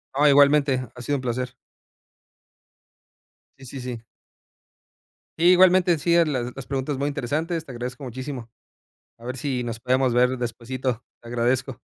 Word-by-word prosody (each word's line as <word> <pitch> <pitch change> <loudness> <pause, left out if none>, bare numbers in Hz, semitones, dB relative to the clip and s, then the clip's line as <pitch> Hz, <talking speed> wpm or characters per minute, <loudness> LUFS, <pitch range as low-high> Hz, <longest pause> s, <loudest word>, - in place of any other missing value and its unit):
Oh, 145 +2 +4
igualmente, 140 -3 +4
ha 125 - -9
sido 145 +3 -1
un - - -6
placer. 125 +1 -3 2.0
Sí, 135 - -13
sí, 130 +2 -8
sí. 125 -2 -5 1.4
Igualmente, 180 +1 +5
en 165 - +2
sí 170 +3 +2
a 170 - +5
las 125 -5 -2
las 135 - -7
preguntas 135 0 -2
muy 140 +1 -1
interesantes, 155 +4 -2
te 135 - -9
agradezco 125 +3 -6
muchísimo, 130 -1 -6 0.7
a 115 - -15
ver 125 +1 -4
si 130 -2 -2
nos 115 -1 -5
podemos 130 0 +1
ver 125 +1 +3
despuesito. 125 +1 -3 0.2
Te 120 - -13
agradezco. 120 +2 -1
130 Hz, 150 wpm, -24 LUFS, 125-145 Hz, 2.0 s, Igualmente